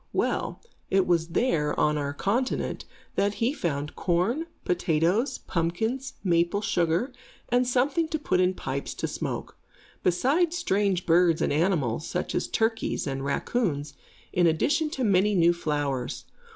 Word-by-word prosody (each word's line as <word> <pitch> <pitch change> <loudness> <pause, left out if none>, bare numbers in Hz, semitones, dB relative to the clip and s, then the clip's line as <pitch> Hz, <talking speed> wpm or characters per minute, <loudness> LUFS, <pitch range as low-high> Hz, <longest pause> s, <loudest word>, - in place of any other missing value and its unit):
Well, - - -1 0.3
it 190 -1 +3
was 170 -2 +1
here, 165 -7 +1
on 150 0 +3
our 145 -1 -1
continent, 225 - -1 0.3
that 205 +1 +1
he 235 +4 +1
found 150 - -3
corn, 200 - 0 0.2
potatoes, 180 - +1
pumpkins, 220 +11 -2
maple 175 +2 +2
sugar, 175 +9 +1 0.4
and 245 +1 +2
something 275 +6 +1
to 315 - -2
put 185 -11 0
in 185 0 +2
pipes 140 -3 -4
to - - -2
smoke; - - -5 0.4
besides 295 - +2
strange 195 - +1
birds 170 -1 +4
and - - +1
animals, 155 -5 +1
such 180 - -3
as - - -1
turkeys 225 0 0
and 135 -1 -3
raccoons, 145 - -1 0.4
in 175 -1 +4
addition 290 - +2
to 265 -3 -3
many 200 -1 +3
new 170 -1 +5
flowers. 145 -6 -2
180 Hz, 140 wpm, -27 LUFS, 160-240 Hz, 0.4 s, new